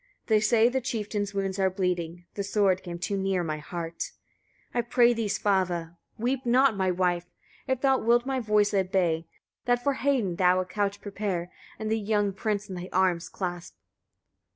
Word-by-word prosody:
They 220 -2 +4
say 225 +1 +4
the 260 +2 0
chieftain's 210 -4 -3
wounds 195 0 -1
are 190 -1 +3
bleeding. 175 -2 -2
The 200 - -3
sword 195 -2 +2
came 175 -2 -6
too 190 +3 -2
near 190 -2 0
my 155 -2 -3
heart. 165 +2 -5 0.6
41. 240 - +1
I 235 - -25
pray 240 -1 +5
thee, 230 -2 -1
Svava! 180 -5 0 0.2
weep 255 +3 -1
not, 250 0 +4
my 190 -1 +1
wife! 175 -1 0 0.4
if 260 -1 0
thou 270 -1 +3
wilt 240 +2 +3
my 265 -1 -1
voice 210 -2 +2
obey, 185 -4 +1 0.4
that 245 0 +2
for 280 - +2
Hedin 255 -10 0
thou 180 0 +4
a 185 - -1
couch 200 +1 -2
prepare, 195 -4 -3 0.3
and 220 0 -3
the 225 - +2
young 205 -1 +1
prince 205 +1 -2
in 190 - -7
thy 180 +1 -6
arms 180 -2 +1
clasp. 175 -2 -5
200 Hz, 180 wpm, -27 LUFS, 180-225 Hz, 0.6 s, pray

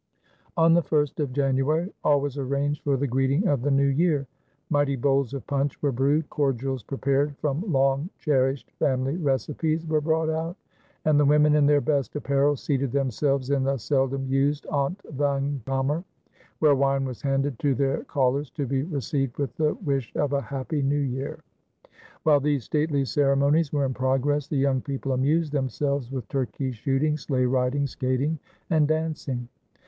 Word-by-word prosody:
On 165 0 +5
the 175 - +5
1st 150 -3 0
of 145 -4 -1
January 140 +6 0
all 145 -1 +4
was 145 -1 -3
arranged 140 +2 -1
for 140 -2 +1
the 140 - -1
greeting 135 - +1
of 140 -7 +1
the 145 - 0
New 140 0 +3
Year. 145 0 +2 0.5
Mighty 145 -2 +2
bowls 135 0 +1
of 135 - -6
punch 140 0 -1
were 145 - +1
brewed, 140 +5 +1
cordials 135 -3 -1
prepared 140 +3 -1
from 150 +3 -1
long 135 +3 +2
cherished 135 -2 0
family 130 +2 +1
recipes 155 - -1
were 155 -1 +1
brought 160 +1 +1
out, 160 +3 -2 0.5
and 155 -1 +4
the 145 - +4
women, 150 +1 +5
in 150 -1 +4
their 145 -1 +4
best 140 -5 -1
apparel, 140 0 +2
seated 135 -1 -1
themselves 135 0 0
in 140 -2 +2
the 135 +1 0
seldom 135 +2 0
used 135 +2 0
ontvangkamer, 140 - -1 0.5
where 150 -2 +4
wine 135 0 +1
was 130 -3 -6
handed 135 -2 -1
to 140 -2 +1
their 135 0 0
callers 140 0 0
to 145 - -4
be 135 +1 0
received 140 -4 -2
with 135 -4 -3
the 155 -1 +1
wish 135 -5 -1
of 145 -1 0
a 140 - +1
"Happy 140 +2 -3
New 140 +1 +1
Year!" 135 -1 -3 0.8
While 150 -2 +5
these 140 -2 0
stately 150 -1 0
ceremonies 140 +3 +2
were 145 -2 +1
in 130 - -1
progress 135 +3 0
the 150 - -3
young 135 -1 +2
people 135 -1 -4
amused 145 +5 +1
themselves 140 -1 -1
with 130 -6 -5
turkey 130 +1 -2
shooting, 135 +6 0
sleigh 130 -3 0
riding, 130 +2 +1
skating, 135 +4 -1 0.3
and 155 -3 +4
dancing. 155 -6 -2
140 Hz, 165 wpm, -25 LUFS, 135-150 Hz, 0.8 s, On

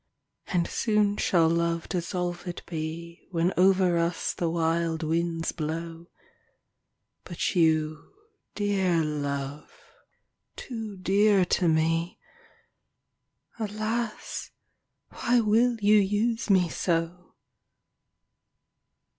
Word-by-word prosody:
And 175 -2 0
soon 210 -2 +1
shall 170 -3 +3
love 170 0 0
dissolved 175 0 -3
be 170 +1 -6
When 175 0 0
over 185 -2 +4
us 170 0 -1
the 170 - -1
wild 165 0 0
winds 165 +1 -1
blow— 165 +1 -5 1.2
But 175 +1 -3
you, 155 -3 +1 0.4
dear 190 -5 +1
love, 145 -1 -4 0.8
too 225 -5 -7
dear 195 +1 +3
to 175 0 +1
me, 165 +2 +1 1.4
Alas! 215 +1 -3 0.6
why 245 0 +1
will 230 +2 +3
you 210 +1 +5
use 215 +4 +1
me 185 -3 +4
so 170 +1 -2
175 Hz, 90 wpm, -27 LUFS, 165-205 Hz, 1.4 s, you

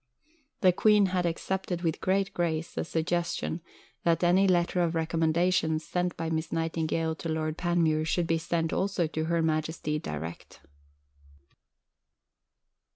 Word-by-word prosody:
" 305 -4 -40
The 185 -3 +6
Queen 210 +2 +5
had 180 -2 0
"accepted 180 +1 -3
with 165 -2 -1
great 195 +1 +1
grace" 165 -1 -1
the - - -2
suggestion 170 +1 -2 0.4
that 170 0 +2
any 185 +3 +4
letter 175 0 +2
of 170 -1 0
recommendations 160 0 +1
sent 180 -1 -1
by 165 0 -3
Miss 160 0 -2
Nightingale 165 0 -1
to 165 +1 -6
Lord 155 -1 -1
Panmure 165 -3 +1
should 170 +1 +1
be 165 0 +1
sent 165 0 -1
also 190 -3 0
to 155 0 -2
Her 170 0 +1
Majesty 155 -1 -1
direct. 85 - -7
165 Hz, 140 wpm, -28 LUFS, 160-180 Hz, 0.4 s, The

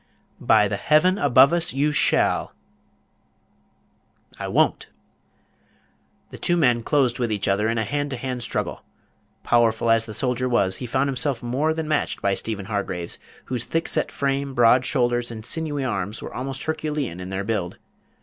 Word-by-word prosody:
"By 105 -2 +4
the 100 0 -2
Heaven 180 - +3
above 140 - +5
us, 170 -5 +1
you 145 +2 +2
shall." 145 - +1 1.9
"I - - -4
won't!" - - +1 1.4
The - - -10
two 175 - +1
men 125 -7 +3
closed 130 -2 +1
with 120 -2 -1
each 105 -2 -1
other 100 +3 +1
in 115 - -1
a 110 - +1
hand 145 +6 -2
to 130 - -4
hand 125 0 -4
struggle. - - -3 0.6
Powerful 115 -1 +2
as 115 0 +3
the 110 - -6
soldier 125 +2 -1
was, 95 -6 +1
he 125 - -6
found 130 +3 0
himself 135 -1 -1
more 135 +6 0
than 160 -1 -3
matched 155 -1 -1
by 100 - +1
Stephen 100 -1 -4
Hargraves, 95 -4 -4 0.3
whose 125 -2 -3
thick 165 0 -1
set - - -1
frame, 140 -1 -2
broad 120 +1 +4
shoulders, 120 -3 +1
and 110 -2 -8
sinewy 150 -2 -2
arms 105 -2 -3
were - - -8
almost 135 +1 -5
herculean 150 - -3
in 90 0 -7
their 95 +1 -3
build. 100 -5 -3
125 Hz, 170 wpm, -23 LUFS, 110-140 Hz, 1.9 s, above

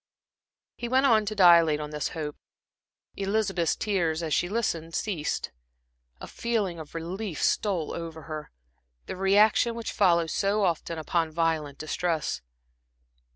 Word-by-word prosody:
He 240 - -4
went 260 +3 +3
on 220 -5 +4
to 215 - -2
dilate 170 -5 +6
on 150 0 -5
this 150 -1 -2
hope. 150 -2 -4 0.8
Elizabeth's 195 -4 0
tears 170 -6 0
as 155 -2 -2
she 175 - +1
listened, 170 -7 -2
ceased. 175 -8 -2 0.7
A - - -7
feeling 210 -8 -2
of 155 0 -10
relief 180 +2 -4
stole 185 -7 0
over 165 -2 -6
her, 155 -1 -7 0.6
the - - -5
reaction 210 +5 +3
which 230 -1 -4
follows 170 -5 +3
so 200 +1 +1
often 170 -2 -1
upon 165 +1 0
violent 155 -3 -1
distress. 160 0 -2
170 Hz, 135 wpm, -27 LUFS, 160-205 Hz, 0.8 s, dilate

